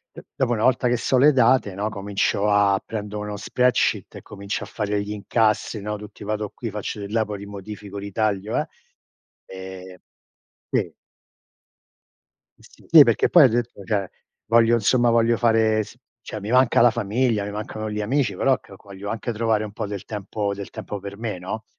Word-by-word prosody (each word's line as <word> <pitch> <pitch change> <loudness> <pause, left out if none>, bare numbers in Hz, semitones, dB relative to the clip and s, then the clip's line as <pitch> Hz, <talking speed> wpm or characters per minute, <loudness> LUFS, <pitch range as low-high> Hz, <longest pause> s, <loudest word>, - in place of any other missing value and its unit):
e - - -10
dopo 130 -3 0
una 110 - -2
volta 130 +1 +3
che 120 0 +2
so 130 +3 +1
le 145 +4 +6
date, 125 -5 +3
no, 105 +3 -2
comincio 100 0 -1
a 100 -1 +3
prendo 105 -1 -5
uno 105 0 -4
spreadsheet 125 +4 +1
e - - -10
comincio 100 -1 -5
a - - -14
fare 105 0 -2
gli 100 - -6
incassi, 110 0 0
no, 105 +1 -3
tutti, 105 0 -11
vado 105 0 -3
qui, 115 - -5
faccio 105 0 -5
di 100 - -7
là, 110 0 +1
poi 105 -1 -6
li 100 - -8
modifico, 100 0 -8
li 100 0 -6
taglio, 105 -1 -1
eh - - -1 0.8
ehm 95 -1 -9 0.7
sì. - - -1 1.7
Sì, 160 -3 +5
perché 115 -4 +2
poi 170 -6 +8
ho - - +7
detto, 120 -3 -3
cioè: 100 -2 -1 0.4
“Voglio, 115 +1 +4
insomma, 120 +2 +3
voglio 115 0 +3
fare 110 -2 +3
s - - -14 0.2
cioè, 110 - -7
mi 105 +3 -5
manca 125 -2 +4
la 120 - +6
famiglia, 115 0 0
mi 105 - -5
mancano 110 +1 -5
gli 105 0 -4
amici, 120 -2 0
però, 135 +7 +2
calco 100 0 -17
voglio 100 +1 -7
anche 115 +1 -3
trovare 110 -1 +1
un 105 - -6
po' 105 - -4
del 100 -1 -6
tempo 105 -1 -3
del 100 0 -7
tempo 105 - -6
per 100 +1 -8
me, 110 -4 -4
no?“ 100 +5 -6
105 Hz, 190 wpm, -23 LUFS, 100-115 Hz, 1.7 s, poi